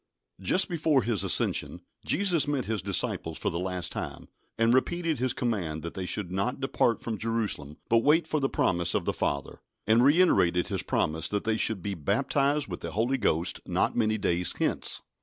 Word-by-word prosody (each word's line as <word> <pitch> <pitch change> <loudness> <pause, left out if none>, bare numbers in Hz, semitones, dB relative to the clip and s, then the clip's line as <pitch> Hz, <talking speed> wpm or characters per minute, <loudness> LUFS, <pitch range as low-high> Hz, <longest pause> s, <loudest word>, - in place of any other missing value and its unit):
JUST 180 - +3
before 155 -6 +1
His 110 -5 0
ascension, 95 - +1 0.2
Jesus 180 -7 +2
met 145 -3 -1
His 110 -3 -2
disciples 90 -4 -1
for - - -2
the 85 - -3
last 90 -1 -3
time, - - -6 0.3
and 115 +1 +3
repeated 165 +3 0
His 130 0 +1
command 90 -12 -2
that 85 - -6
they 95 -1 -5
should 95 -3 -3
"not 100 +9 -1
depart 130 -4 +1
from 110 -3 -5
Jerusalem, 105 -10 -2
but 115 - +4
wait 150 +7 +3
for 155 - -1
the 135 -1 0
promise 85 -1 0
of - - 0
the - - 0
Father," 70 -2 -3 0.3
and 110 +3 +4
reiterated 140 - +3
His - - -1
promise 80 +1 -1
that 105 -1 -2
they 110 0 0
should 110 -4 +1
be 100 - -2
"baptised 135 - 0
with 90 -3 -6
the 85 - -6
Holy 120 +6 0
Ghost 85 -5 0
not - - 0
many 110 -2 +1
days 90 -4 0
hence." - - 0
110 Hz, 190 wpm, -28 LUFS, 90-135 Hz, 0.3 s, but